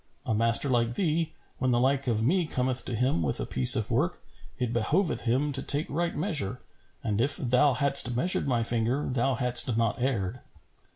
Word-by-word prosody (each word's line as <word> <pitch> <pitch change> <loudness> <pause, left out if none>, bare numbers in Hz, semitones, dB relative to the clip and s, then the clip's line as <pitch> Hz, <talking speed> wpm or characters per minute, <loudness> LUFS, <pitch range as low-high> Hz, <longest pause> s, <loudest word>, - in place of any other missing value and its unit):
A - - -2
master 115 +5 +3
like 120 -2 -1
thee, 165 -3 -1 0.3
when 130 - -1
the 120 -1 +1
like 135 +1 0
of 110 -2 -1
me 175 +4 0
cometh 130 -2 -2
to 120 - -4
him 125 -6 -1
with 70 -5 -2
a - - -3
piece 65 -1 +6
of - - -3
work, - - -1 0.4
it 120 -2 -3
behoveth 150 - -1
him 135 +5 0
to 135 - -3
take 145 +2 +3
right 170 +3 -3
measure; 150 - -3 0.4
and 110 -1 -2
if 140 +4 0
thou 125 +2 +1
hadst 135 -2 +1
measured 170 +4 +1
my 120 -3 0
finger, 120 +4 -1
thou 130 +1 -1
hadst 125 0 +5
not 115 +1 -1
erred.' 120 -3 -3
125 Hz, 190 wpm, -26 LUFS, 115-140 Hz, 0.4 s, piece